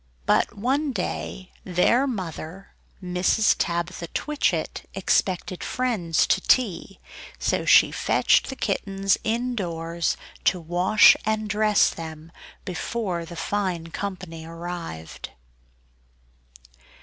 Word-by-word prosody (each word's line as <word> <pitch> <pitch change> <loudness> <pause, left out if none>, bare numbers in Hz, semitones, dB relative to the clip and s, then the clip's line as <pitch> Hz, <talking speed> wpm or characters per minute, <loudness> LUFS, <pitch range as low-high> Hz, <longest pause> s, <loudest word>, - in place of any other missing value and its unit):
But - - +2
one 270 +6 0
day 185 -1 -4
their 195 +9 +2
mother 185 -4 -6 0.3
Mrs. 180 +4 +2
Tabitha 170 0 -2
Twitchit 300 - -2
expected 185 -1 0
friends 210 -11 0
to 190 - +2
tea; 195 -6 +1 0.4
so - - 0
she - - +6
fetched - - +2
the 265 - -5
kittens 195 -3 0
indoors, 175 -8 -2 0.3
to 180 - +3
wash 175 +5 +5
and 215 0 -1
dress 210 0 +3
them, 160 0 -9 0.3
before 185 -1 -3
the 170 - -9
fine 175 -2 -2
company 175 -5 -6
arrived. 165 - -7
185 Hz, 100 wpm, -24 LUFS, 170-215 Hz, 0.4 s, she